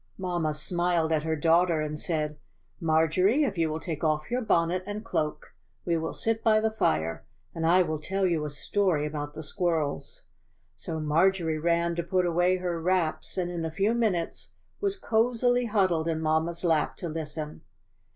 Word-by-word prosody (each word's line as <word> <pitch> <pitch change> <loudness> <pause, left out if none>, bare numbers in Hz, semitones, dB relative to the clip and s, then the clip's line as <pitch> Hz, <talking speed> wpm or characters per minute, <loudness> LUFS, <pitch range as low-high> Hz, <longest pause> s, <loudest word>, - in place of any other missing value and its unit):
Mamma 175 -5 -1
smiled 175 0 0
at 155 -1 +2
her 160 +1 -1
daughter, 165 +2 +3
and 150 0 -3
said: 150 -3 -2 0.4
"Marjorie, 165 - +3
if 215 -9 -1
you 165 -2 +1
will 155 +1 -3
take 160 -2 -5
off 155 +2 0
your 250 +1 0
bonnet 175 -4 +1
and 210 +2 -5
cloak 155 -9 -3 0.3
we 170 - +1
will 160 0 -2
sit 225 0 -1
by 215 -2 +5
the 220 0 0
fire, 80 - 0 0.3
and 165 0 -1
I 180 +2 +5
will 155 -2 -3
tell 195 +5 -1
you 170 -4 +1
a 150 - -3
story 160 +1 0
about 150 -1 -5
the 160 - -6
squirrels." 165 -4 -2 0.5
So 160 -1 -4
Marjorie 160 +1 +2
ran 170 +1 +1
to - - +1
put 180 +1 +1
away 175 +2 +2
her 175 -2 -3
wraps, 180 -1 0
and 175 -1 -1
in 170 -2 -3
a 160 - -1
few 195 +7 +1
minutes 210 -8 -1 0.3
was 400 -1 0
cozily 245 0 +2
cuddled 185 -7 +1
in 160 -1 0
mamma's 160 +2 0
lap 160 -3 +1
to 175 - -5
listen. 155 -1 -5
170 Hz, 180 wpm, -27 LUFS, 155-185 Hz, 0.5 s, by